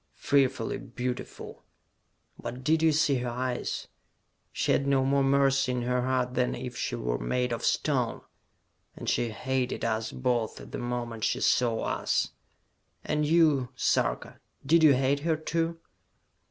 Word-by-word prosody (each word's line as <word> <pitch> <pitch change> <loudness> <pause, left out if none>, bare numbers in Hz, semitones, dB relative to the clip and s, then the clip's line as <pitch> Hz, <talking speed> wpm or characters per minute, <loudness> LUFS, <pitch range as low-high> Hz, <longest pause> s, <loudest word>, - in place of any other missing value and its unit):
"Fearfully 130 -5 +1
beautiful! 125 +1 -6 0.8
But 125 +2 -6
did 155 +2 +2
you 160 0 +5
see 150 -2 +2
her 125 0 -2
eyes? 125 +1 -3 0.6
She - - 0
had 140 - +2
no 135 -1 +3
more 140 +1 +2
mercy 135 -1 +3
in 125 -1 -2
her 125 +1 0
heart 125 0 0
than 125 -1 0
if 125 -1 -6
she - - -2
were - - -2
made 125 - -1
of 115 - -3
stone! - - 0 0.7
And - - -8
she 120 - +1
hated 130 +3 -2
us 110 -1 -1
both 125 -3 -1
the - - -7
moment 120 -2 -4
she - - +1
saw 115 -2 +2
us!" - - 0 0.7
"And 150 0 0
you, 150 -6 +3
Sarka - - 0 0.3
did 165 +4 +5
you 150 -4 +7
hate 135 +2 +1
her, 160 +1 0
too?" 165 +1 -1
130 Hz, 150 wpm, -28 LUFS, 125-140 Hz, 0.8 s, you